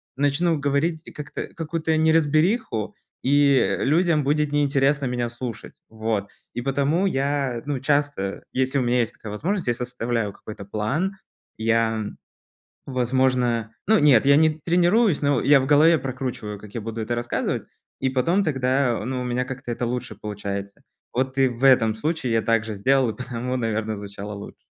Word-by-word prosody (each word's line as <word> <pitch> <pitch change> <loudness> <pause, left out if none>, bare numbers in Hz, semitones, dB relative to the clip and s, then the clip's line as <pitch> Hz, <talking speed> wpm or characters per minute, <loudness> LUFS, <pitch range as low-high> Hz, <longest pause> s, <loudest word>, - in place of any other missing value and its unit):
начну 145 +4 +1
говорить 145 +3 -1
как-то 145 -3 -6
какую-то 160 0 -1
неразбериху, 160 - +2 0.3
и, 140 0 +4
э, - - 0
людям 155 +1 +3
будет 150 +1 +1
неинтересно 140 -1 +2
меня 120 -1 -1
слушать. 120 -1 -7
Вот, 110 -2 -2 0.3
и 120 - -2
потому 140 +7 +1
я, 135 -6 0
ну, 145 -3 -1
часто, 145 -8 -1
если 130 +2 +1
у - - +1
меня 120 +1 +2
есть 115 - -2
такая 110 - -10
возможность, 180 - -2
я 120 - +3
составляю 120 -4 -2
какой-то 105 -2 -10
план, 135 - -1 0.4
я, 115 -1 +1 0.8
возможно, 125 -3 +1
ну, 220 0 +5
нет, 135 -4 +5
я 140 0 +6
не 155 +1 +5
тренируюсь, 175 +2 +3
но 140 -3 +2
я 140 -1 +5
в 130 - -2
голове 155 +3 +5
прокручиваю, 125 -5 -5
как 105 +1 -13
я 115 - -4
буду 115 +1 -5
это 115 +2 -2
рассказывать, 120 0 -2 0.4
и 130 - +1
потом 165 +10 +1
тогда, 130 -4 +1
ну, 130 -1 -2
у - - -4
меня 125 +1 -1
как-то 130 -2 -6
это 120 +1 -2
лучше 120 -3 -4
получается. 100 -1 -6 0.3
Вот, 130 +1 -1
и 135 -1 +5
в 120 +2 -4
этом 115 -5 +5
случае 145 +1 -2
я 110 - +2
так 115 0 +2
же 110 - -4
сделал, 130 +4 +2
и - - -8
потому, 125 0 -4
наверно, 110 -2 -2
звучало 100 +1 -7
лучше. 100 - -10
130 Hz, 165 wpm, -23 LUFS, 115-145 Hz, 0.8 s, я